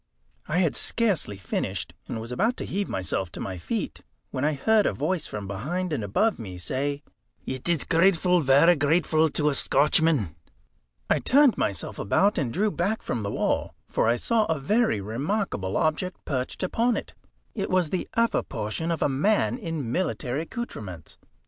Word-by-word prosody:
I 160 - 0
had 175 -5 +2
scarcely 195 - +1
finished, 90 -5 -3
and - - -4
was 115 +2 -7
about 225 - +1
to - - -4
heave 200 +1 -2
myself 95 -1 -2
to - - -7
my 95 -2 -5
feet, 80 - -4 0.3
when 130 - -3
I 155 +1 +2
heard 215 +9 +3
a - - 0
voice 185 -5 -1
from 105 -2 -6
behind 155 - -3
and 130 - -2
above 210 - +1
me 95 -5 -7
say 140 +9 -2 0.4
"It 130 +5 -4
is 170 -3 +3
grateful, 180 +1 +3
varra 145 +5 +5
grateful 155 +1 +2
to 150 +1 +1
a - - 0
Scotchman." 145 - +3 0.7
I - - +2
turned 280 -2 +5
myself 100 - -2
about, 200 - +2
and 130 -6 -1
drew 210 - +1
back 195 +6 -1
from 120 - -2
the 100 - -3
wall, - - -1
for - - +1
I 120 - +4
saw 220 - +1
a 160 -4 0
very 210 - +2
remarkable 115 - -2
object 160 +4 -1
perched 130 +4 -3
upon 230 +6 +1
it. - - -6 0.4
It 200 -3 -3
was 180 -4 +1
the 185 - -2
upper 230 0 +2
portion 110 +9 -4
of 165 -2 0
a - - +4
man 175 - +2
in 160 - -4
military 145 -5 -1
accoutrements. 110 - -7
155 Hz, 175 wpm, -26 LUFS, 115-185 Hz, 0.7 s, varra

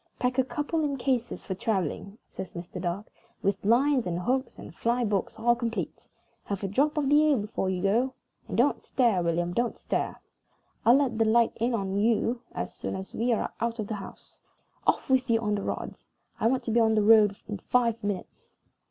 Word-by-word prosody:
"Pack 250 +1 0
a - - +5
couple 300 +4 -2
in 285 -2 -1
cases 245 -2 -1
for 190 - -2
traveling," 195 0 -2
says 185 - -8
Mr. 175 +1 -7
Dark, 180 +4 -2 0.4
"with 195 0 0
lines, 250 +3 +3
and 170 -1 -1
hooks, 260 +7 -1
and - - -10
fly 240 +1 0
books 205 -3 -1
all 240 +2 +3
complete. 235 -1 -4 0.4
Have 200 -1 -4
a - - 0
drop 280 +10 +1
of 290 -2 +1
the 295 +2 +5
ale 285 - +4
before 205 -3 -2
you 185 -1 -2
go 240 +7 +2 0.3
and - - -4
don't - - +3
stare, 230 -8 +2
William, 170 +1 0
don't 240 +4 0
stare. - - -2 0.7
I'll 235 - +8
let 265 -5 +1
the 225 - +4
light 230 +1 +4
in 235 +2 +1
on 195 -2 -2
you 230 +3 +1
as - - -4
soon - - -5
as 190 0 -7
we 240 +2 0
are 225 - -1
out 230 0 -1
of 215 - -3
the 215 - -4
house. 195 -2 -10 0.5
Off - - +2
with 260 -1 +2
you 225 -1 +4
for 215 -2 -1
the 205 -1 0
rods! - - -5 0.3
I - - +3
want 255 +2 +1
to 230 - -2
be 235 - +3
on 220 -1 +4
the 215 - +3
road 210 -2 +6
in 210 -2 -4
five 235 -1 +1
minutes." 205 -3 -5
225 Hz, 210 wpm, -28 LUFS, 200-250 Hz, 0.7 s, I'll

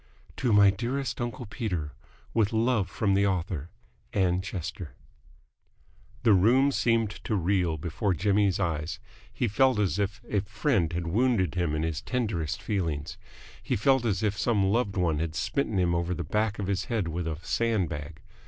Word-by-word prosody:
"To 125 -3 +1
my 100 -1 +7
dearest 125 +7 -3
uncle 120 +1 -4
Peter, 95 - -3 0.4
with 110 -3 +2
love 110 -4 +1
from 100 0 0
the 100 +1 +3
author, 85 -4 -2 0.4
Ann 90 -2 +2
Chester." 90 -3 -6 1.3
The 115 -3 +6
room 125 +9 +4
seemed 115 -5 +1
to 110 - -1
reel 90 -3 +1
before 85 +5 -1
Jimmy's 100 0 +2
eyes. 80 -2 -2 0.3
He 120 - -1
felt 130 +3 +3
as 100 -1 +1
if 100 -1 -1
a 105 - +1
friend 105 - 0
had 85 0 -3
wounded 100 - +1
him 85 -4 0
in 75 - -1
his 80 -2 -2
tenderest 105 - -2
feelings. 85 -4 -2 0.4
He - - -1
felt 135 +4 +3
as 110 -3 0
if 105 -1 +1
some 105 -2 +1
loved 100 0 +1
one 85 -4 +1
had 80 0 -3
smitten 110 - -1
him 90 -2 +2
over 85 +1 0
the 85 - -3
back 105 +6 0
of 100 - -3
the 100 0 -1
head 110 -7 0
with 85 +1 -3
a 80 -2 -3
sandbag. 85 -7 -1
100 Hz, 170 wpm, -28 LUFS, 85-110 Hz, 1.3 s, my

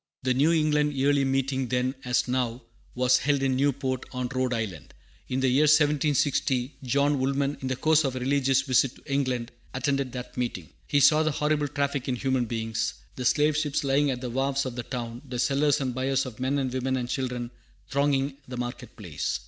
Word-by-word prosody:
The 130 0 +2
New 145 +6 +3
England 150 -2 +2
Yearly 140 +1 +2
Meeting 135 -1 0
then, 125 +1 0
as 125 0 +1
now, 125 -1 -1 0.3
was 125 0 +4
held 140 0 +1
in 130 -1 +2
Newport, 135 -1 0
on 125 -1 -3
Rhode 130 -1 0
Island. 105 - -4 0.3
In 130 +1 -1
the 135 - +3
year 135 +4 +4
1760 145 -3 +2
John 140 +2 +1
Woolman, 140 +1 0
in 130 - -3
the 130 - -1
course 155 +3 +3
of 135 -2 -1
a - - -2
religious 135 0 +2
visit 130 -1 +2
to - - -19
New 140 - -3
England, 130 -4 -1 0.2
attended 135 0 0
that 125 -1 -7
meeting. 115 - -3 0.2
He 145 - +2
saw 155 +3 +6
the 155 - +2
horrible 150 0 0
traffic 140 -1 -2
in 130 - 0
human 130 -1 0
beings, 110 -1 -2 0.2
the 125 - -5
slave 150 +4 +3
ships 150 -1 0
lying 140 +1 +2
at 125 -2 -2
the 125 -2 -4
wharves 135 +2 0
of 130 -2 -4
the 120 - -3
town, 120 -1 -6
the 125 -3 -6
sellers 140 +4 +2
and 130 -3 -2
buyers 135 +1 0
of 125 -3 -9
men 130 +2 0
and 130 -2 -1
women 130 0 -1
and 125 -1 -3
children 125 -2 -3 0.4
thronging 140 0 0
the 125 0 -6
market 120 -1 -6
place. 90 -9 -3
130 Hz, 205 wpm, -27 LUFS, 125-140 Hz, 0.4 s, saw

